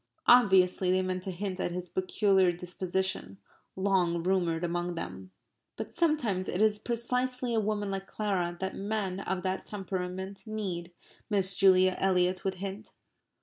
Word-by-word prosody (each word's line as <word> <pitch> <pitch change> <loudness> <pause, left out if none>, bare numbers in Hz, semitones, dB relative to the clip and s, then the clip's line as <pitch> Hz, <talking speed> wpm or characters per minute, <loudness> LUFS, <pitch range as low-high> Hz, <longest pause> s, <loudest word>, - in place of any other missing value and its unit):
Obviously 190 -6 +5
they 185 +1 +3
meant 185 0 -2
to 190 - -5
hint 190 +1 -4
at - - 0
his 180 +1 -5
peculiar 185 +1 +2
disposition 180 - -3 0.4
long 185 -3 +1
rumoured 175 -3 +1
among 175 0 -2
them. 95 - -6 0.5
"But - - -6
sometimes 245 - +1
it 180 - -2
is 215 -1 +3
precisely 250 +1 -1
a 225 - +3
woman 205 -1 -1
like 195 0 -4
Clara 185 -5 -1
that 190 0 -3
men 200 -2 -2
of 190 -1 -3
that 190 0 -2
temperament 190 0 -5
need..." 185 -5 -4 0.4
Miss 195 -2 +2
Julia 185 -1 +5
Eliot 185 -1 +2
would 190 -1 -1
hint. 195 +3 -6
190 Hz, 145 wpm, -30 LUFS, 180-205 Hz, 0.5 s, Obviously